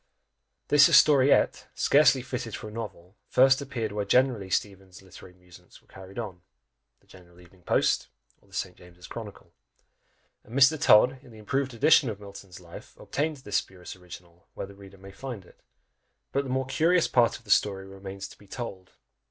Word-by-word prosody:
This 145 -1 +7
historiette, 140 -2 +4
scarcely 140 -3 +4
fitted 125 -4 -5
for 110 - -8
a - - -12
novel, 105 -4 -9
first 130 +1 +4
appeared 125 -6 -4
where 105 0 -2
generally 115 -2 +1
Steevens's 95 -1 -4
literary 95 -1 -15
amusements 90 -1 -18
were - - -32
carried 95 0 -13
on, 105 -6 -5
in - - -33 0.6
the - - -31
General 90 -2 -18
Evening 90 +1 -20
Post, - - +1 0.3
or - - -28
the 95 - -24
St. 95 -2 -4
James's 90 0 -16
Chronicle: 110 -4 -10 0.9
and 120 - -8
Mr. 140 +3 +5
Todd, 125 +5 +5
in 130 - -17
the 110 - -15
improved 130 +4 -3
edition 135 +2 +4
of 105 -2 -6
Milton's 100 -3 -12
Life, 85 -2 -13
obtained 150 +1 -3
this 105 -6 -2
spurious 90 -1 -7
original, 90 0 -14
where - - -5
the 100 - -14
reader 100 0 -15
may 95 +1 -13
find 115 -3 -8
it; - - -21 0.7
but 140 +1 -1
the - - -6
more 130 +1 -1
curious 165 +6 +2
part 120 -2 +2
of - - -22
the - - -6
story 95 -2 +2
remains 95 0 -9
to - - -16
be 100 - -18
told. 95 -4 -8
105 Hz, 185 wpm, -27 LUFS, 95-130 Hz, 0.9 s, This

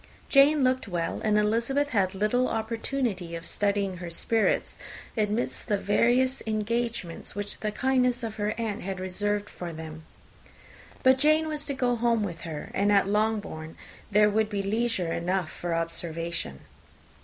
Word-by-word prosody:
Jane 280 +1 +6
looked 255 -2 +1
well, 175 -3 -2
and 210 -1 +3
Elizabeth 235 +7 +1
had 195 -5 +1
little 215 +6 +2
opportunity 225 -5 -2
of 165 0 -6
studying 200 -2 0
her 175 -1 -6
spirits, 220 +6 0 0.4
amidst 215 +1 -1
the 210 -3 +2
various 245 +6 +2
engagements 220 -5 -2
which 205 0 -4
the 215 - -2
kindness 250 +1 +1
of 220 -1 -4
her 210 0 -1
aunt 225 -3 -2
had 190 0 -4
reserved 205 +3 -1
for 175 -1 -7
them. 160 0 -8 1.0
But 260 0 +5
Jane 310 +2 +4
was 300 -1 -3
to 280 - -2
go 250 -2 +1
home 230 -1 +2
with 170 -4 -5
her, 155 -3 -6
and 205 +1 +2
at 200 -1 +4
Longbourn 205 -7 -1 0.3
there 210 0 +5
would 215 +1 +1
be 200 -2 -2
leisure 205 -4 0
enough 180 0 -1
for 175 -1 -3
observation. 165 - -3
210 Hz, 155 wpm, -27 LUFS, 185-240 Hz, 1.0 s, Jane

